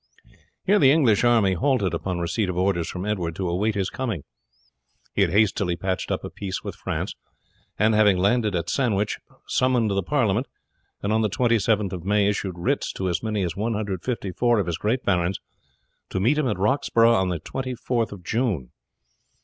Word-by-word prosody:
Here 205 +2 +4
the 135 - +6
English 125 -9 +4
army 115 -6 +4
halted 100 - +1
upon 90 +2 -2
receipt 90 +4 -1
of 90 - -3
orders 90 -2 +1
from 90 +1 -5
Edward 90 -6 -2
to 90 -2 -2
wait 105 +3 0
his 95 -1 -1
coming. 115 - -3 0.9
He - - +1
had 100 - +4
hastily 100 -2 +2
patched 95 +1 -3
up - - -2
a - - -6
peace 95 -2 -5
with - - -5
France, - - -4 0.6
and, 110 +2 +3
having 105 -3 +4
landed 105 +2 +2
at 85 -1 -2
Sandwich, 105 -6 0 0.3
summoned 125 -4 +2
the 100 0 +1
parliament, 120 0 +1 0.6
and 100 +2 0
on 110 - +2
the 110 - +1
27th 110 -3 +1
of 90 -3 -5
May 100 +1 +2
issued 100 -3 -2
writs 85 - -1
to 95 -1 -2
as 85 - -1
many 110 -3 -1
as 85 -3 -2
154 110 +1 -1
of 100 - 0
his 85 -1 -3
great 120 +5 0
barons 90 -1 +1 0.7
to 95 - -2
meet 130 +10 +2
him 145 - +1
at 105 - -1
Roxburgh 115 +2 +3
on 95 -4 +2
the 85 -2 -2
24th 125 - -3
of 100 -3 -9
June. 105 - -1
100 Hz, 180 wpm, -24 LUFS, 95-115 Hz, 0.9 s, the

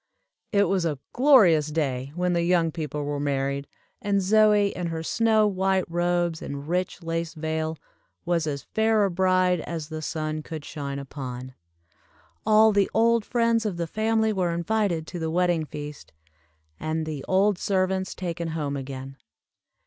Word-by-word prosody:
It 200 -1 +4
was 195 -3 +1
a 155 -4 -1 0.2
glorious 215 - +5
day 140 -4 -2
when 180 0 0
the 170 - +1
young 170 -1 +2
people 150 -3 -4
were 145 0 -2
married, 140 0 -1 0.3
and 200 -1 +1
Zoie 210 +1 +4
in 180 -1 -3
her 165 -1 -4
snow 220 +3 +3
white 190 -1 +1
robes 175 -1 0
and 140 +1 -6
rich 180 +1 -2
lace 165 0 -3
veil, 160 0 -2 0.5
was 170 -2 0
as 140 -2 -3
fair 220 -1 +2
a 195 - -1
bride 185 0 +2
as 160 -1 -5
the 155 -1 -5
sun 155 0 -3
could 155 -1 -7
shine 140 -2 -5
upon. 130 -2 -7 0.9
All 220 0 +6
the 200 -2 +2
old 230 0 +4
friends 230 0 +1
of 205 -5 -2
the 170 - -1
family 220 +4 +1
were 180 -4 0
invited 175 -2 0
to 175 - -7
the 160 -1 -2
wedding 175 -1 +1
feast, 150 -1 -8 0.7
and 160 0 -2
the 150 -3 -5
old 195 0 +3
servants 190 -1 0
taken 170 -2 -4
home 150 -3 -3
again. 135 0 -7
170 Hz, 160 wpm, -25 LUFS, 155-195 Hz, 0.9 s, All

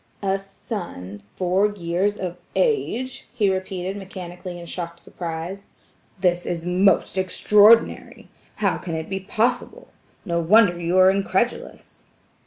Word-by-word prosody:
"A 195 0 +1
son 175 - -7
four 185 +3 +2
years 190 +2 -1
of 180 -2 -4 0.2
age!" 265 - 0
he 205 -5 +2
repeated 190 0 -4
mechanically 180 -2 -8
in 170 - -9
shocked 170 -1 -6
surprise. 170 +4 -6 0.5
"This 175 -1 +1
is 170 -1 -3
most 190 +1 +2
extraordinary! 210 +4 +4 0.3
How - - 0
can 165 -3 -5
it 160 0 -5
be 190 - -1
possible?" 240 - -1 0.4
No 170 -3 0
wonder 180 +1 +4
you 170 +2 0
are 185 0 +7
incredulous. 195 +4 -2
190 Hz, 125 wpm, -23 LUFS, 175-205 Hz, 0.5 s, are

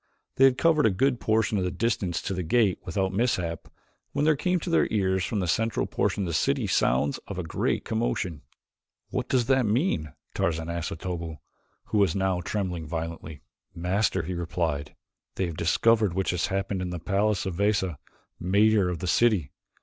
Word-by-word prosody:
They 135 - +7
had 130 -1 +4
covered 160 -5 +4
a - - +4
good 125 +6 +1
portion 110 -1 +1
of - - 0
the 90 - 0
distance 105 -6 -1
to - - -2
the 90 - -2
gate 100 +3 +2
without 95 +1 -1
mishap 90 -7 -1 0.5
when 145 - +1
there 155 -1 +4
came 180 +5 0
to 175 - -4
their - - +3
ears 95 -3 +1
from 105 0 -1
the 90 - -1
central 115 +6 0
portion 100 - -1
of - - -2
the - - -2
city - - +1
sounds 70 +3 +1
of - - -6
a - - -2
great - - -1
commotion. 105 -8 -2 0.7
"What - - -2
does 125 -3 +2
that 130 -2 +3
mean?" 105 - 0 0.2
Tarzan 80 0 -1
asked 85 0 -3
of - - -6
Otobu, 85 -2 -5 0.5
who 105 - +1
was 95 -5 +3
now 95 -2 0
trembling 90 -4 -3
violently. 80 -2 -5 0.3
"Master," 90 +2 0
he 90 +3 -4
replied, 80 -4 -2 0.4
"they 95 - 0
have 85 -2 -5
discovered 105 +5 +3
that - - -9
which 95 0 0
has 90 -1 0
happened 95 0 -2
in 90 - -3
the 90 - -4
palace 100 +4 0
of 95 - -2
Veza, 100 -6 +1 0.4
mayor 100 +1 +3
of 85 -3 -4
the 90 - -3
city. 100 - +2
95 Hz, 195 wpm, -27 LUFS, 85-110 Hz, 0.7 s, They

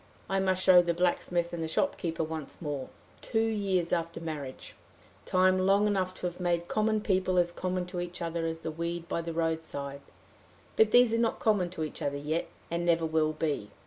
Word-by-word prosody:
I 195 0 +1
must 185 -1 +1
show 180 -1 +8
the 170 -1 -1
blacksmith 175 0 0
and 170 - -3
the 160 - -1
shopkeeper 165 - -1
once 155 -2 -6
more 145 -4 -4 0.3
two 225 0 0
years 195 -5 0
after 170 -1 -1
marriage 150 -5 -6 0.5
time 185 0 +4
long 195 +2 +4
enough 190 -3 0
to - - -6
have 175 0 -3
made 175 -1 0
common 215 +1 +1
people 185 -2 +1
as 175 -1 +3
common 185 +1 -2
to 180 0 -5
each 175 0 -5
other 165 -1 -2
as 165 0 -3
the 160 - -3
weed 170 +1 -4
by 170 - -1
the 165 0 -5
roadside; 160 -4 -2 0.7
but 220 - +5
these 245 0 +5
are 230 - +2
not 230 -1 +1
common 205 -5 +2
to 170 -3 -4
each 155 - -6
other 140 0 -1
yet, 155 +4 -2 0.2
and 170 0 -1
never 170 -1 +2
will 155 -1 +1
be. 150 -9 -2
175 Hz, 200 wpm, -29 LUFS, 160-185 Hz, 0.7 s, show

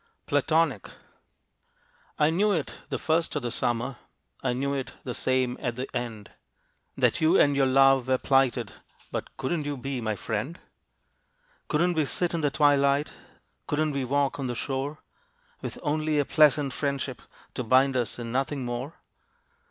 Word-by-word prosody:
PLATONIC. 155 +3 +1 1.3
I 150 +1 +3
knew 205 +5 +2
it 165 -7 -1 0.2
the - - -1
first 165 +1 0
of - - -2
the 120 - -2
Summer 120 +3 -1 0.5
I - - +1
knew 140 +3 -1
it 135 -2 -4
the 125 - -4
same 130 0 0
at 120 -4 -2
the 130 +2 -4
end 115 -4 -4 0.7
That - - +2
you 160 +4 +5
and 145 -1 +4
your 135 -1 +3
love 135 -1 +5
were 130 0 +3
plighted, 130 -5 +1 0.4
But - - -5
couldn't 155 +4 -1
you 145 -1 -3
be 135 0 -4
my 110 -1 -1
friend? 115 - -3 1.1
Couldn't 175 +4 +2
we 155 -3 +1
sit 175 +5 -1
in 165 - -1
the 145 - +2
twilight, 140 0 +3 0.5
Couldn't 155 +1 0
we 140 -1 -2
walk 140 +2 0
on 135 - -2
the 120 - -3
shore, 140 +4 -3 0.6
With - - -5
only 155 0 0
a 145 - +2
pleasant 150 -3 +4
friendship 140 -3 -3 0.3
To 125 - -3
bind 130 +3 +4
us, 120 -3 -1
and 115 -1 -5
nothing 135 0 -1
more? 125 +6 -4
135 Hz, 160 wpm, -27 LUFS, 125-150 Hz, 1.3 s, you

